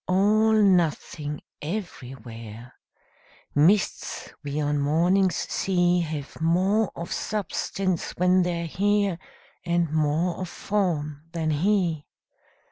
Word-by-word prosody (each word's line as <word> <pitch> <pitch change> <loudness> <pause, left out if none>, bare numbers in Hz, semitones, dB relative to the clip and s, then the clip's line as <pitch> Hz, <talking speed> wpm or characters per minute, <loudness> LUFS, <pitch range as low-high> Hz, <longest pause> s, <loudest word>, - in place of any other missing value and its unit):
All 210 +4 +3
nothing 170 -7 +1 0.2
everywhere: 125 - -7 0.8
Mists 175 +8 +1
we 145 +1 -3
on 145 -1 0
mornings 175 +6 +2
see 175 -2 +1
Have 155 -3 -5
more 185 +6 +2
of 170 - -5
substance 195 -3 -2
when 180 +1 +4
they're 170 -1 -1
here 200 +1 +1 0.4
And 170 -3 0
more 155 +3 +1
of 185 - -4
form 160 -8 -2
than 160 -2 -1
he. 170 -1 +1
170 Hz, 100 wpm, -25 LUFS, 150-190 Hz, 0.8 s, when